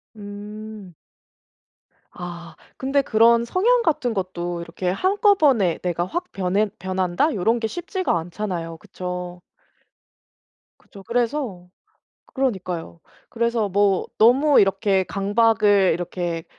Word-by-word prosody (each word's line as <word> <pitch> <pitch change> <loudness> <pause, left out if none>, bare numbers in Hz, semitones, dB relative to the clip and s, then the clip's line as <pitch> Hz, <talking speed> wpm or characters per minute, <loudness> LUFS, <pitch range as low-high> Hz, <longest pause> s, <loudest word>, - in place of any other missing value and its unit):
음. 210 -1 -9 1.2
아. 175 -1 -9 0.2
근데 275 +2 +1
그런 235 -1 +4
성향 470 - +2
같은 255 -7 0
것도 175 -3 -3
이렇게 175 +2 -4
한꺼번에 300 - +3
'내가 175 -1 -1
확 350 - -5
변해 195 +3 0
변한다.' 185 - 0
요런 225 +5 +1
게 225 - -1
쉽지가 350 - -2
않잖아요. 170 -1 -5
그쵸? 180 +1 -7 1.4
그쵸. 200 -2 -15
그래서 235 -5 -2 0.7
그러니까요. 185 - -3 0.3
그래서 235 -2 0
뭐 200 0 +2
너무 270 +6 +5
이렇게 195 0 +2
강박을 205 -1 +3
이렇게 170 -1 -3
200 Hz, 230 characters per minute, -22 LUFS, 180-235 Hz, 1.4 s, 너무